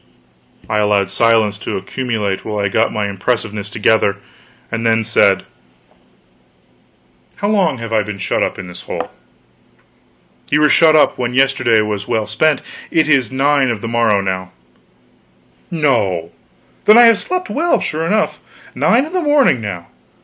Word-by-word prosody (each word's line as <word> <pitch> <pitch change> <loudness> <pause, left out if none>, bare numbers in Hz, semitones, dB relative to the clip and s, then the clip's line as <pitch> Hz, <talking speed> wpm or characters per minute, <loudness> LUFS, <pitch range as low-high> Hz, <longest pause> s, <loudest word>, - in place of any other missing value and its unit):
I 105 - 0
allowed 100 -2 +1
silence 110 -1 +2
to - - -4
accumulate 105 -1 -3
while 105 -1 -5
I 100 -1 0
got 110 +3 +1
my 105 -1 -2
impressiveness 105 0 -3
together, 105 -1 +1 0.5
and 115 - -3
then 115 -1 +2
said: 105 -3 +2 1.9
"How 205 - -2
long 185 -10 +1
have 115 -1 -6
I 110 - +3
been 105 -1 -6
shut 95 - -2
up - - -1
in - - -7
this 90 0 -10
hole?" - - -6 1.4
"Ye 145 - +2
were 150 0 +3
shut 160 +1 +5
up 155 - +3
when 125 0 -2
yesterday 130 -4 +3
was 105 -1 -4
well 110 -3 -1
spent. 135 +9 0 0.3
It 160 -2 +1
is 135 -7 +2
9 135 0 +2
of 115 -4 -3
the 115 - -5
morning 115 -4 +1
now." 95 -1 -3 1.2
"No! 105 - 0 0.5
Then 215 - +7
I 240 - +8
have 230 -3 +5
slept 365 0 -3
well, 335 +4 +1
sure 160 +2 -3
enough. 215 +3 0 0.3
Nine 245 +5 +2
in 320 - -10
the 365 - 0
morning 290 - +3
now! 95 -5 -6
115 Hz, 155 wpm, -16 LUFS, 105-150 Hz, 1.9 s, I